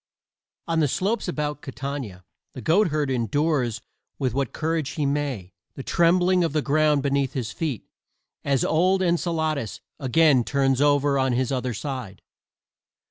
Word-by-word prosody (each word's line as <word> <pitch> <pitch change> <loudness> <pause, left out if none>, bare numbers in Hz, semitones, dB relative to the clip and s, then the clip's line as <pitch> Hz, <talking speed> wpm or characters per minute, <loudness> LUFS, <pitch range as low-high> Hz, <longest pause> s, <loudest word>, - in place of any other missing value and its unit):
On 165 -1 +1
the 150 - +3
slopes 205 - -1
about 150 -4 -3
Catania 130 -8 -6 0.3
the 130 - -8
goatherd 155 - +2
endures 130 -1 0 0.4
with 130 -5 -1
what 135 -2 -1
courage 160 -2 -2
he 150 - -1
may 140 -10 -2 0.2
the 135 - -7
trembling 180 +3 +3
of 165 - -1
the 155 -2 0
ground 150 -1 +2
beneath 140 -2 0
his 120 -5 -3
feet 155 - -4 0.6
as 140 -3 +1
old 185 +4 +2
Enceladus 160 - -1 0.2
again 135 -1 +4
turns 135 0 +1
over 145 -1 +3
on 130 -1 +1
his 130 +1 0
other 125 -3 -2
side. 125 - -6
140 Hz, 140 wpm, -24 LUFS, 130-160 Hz, 0.6 s, again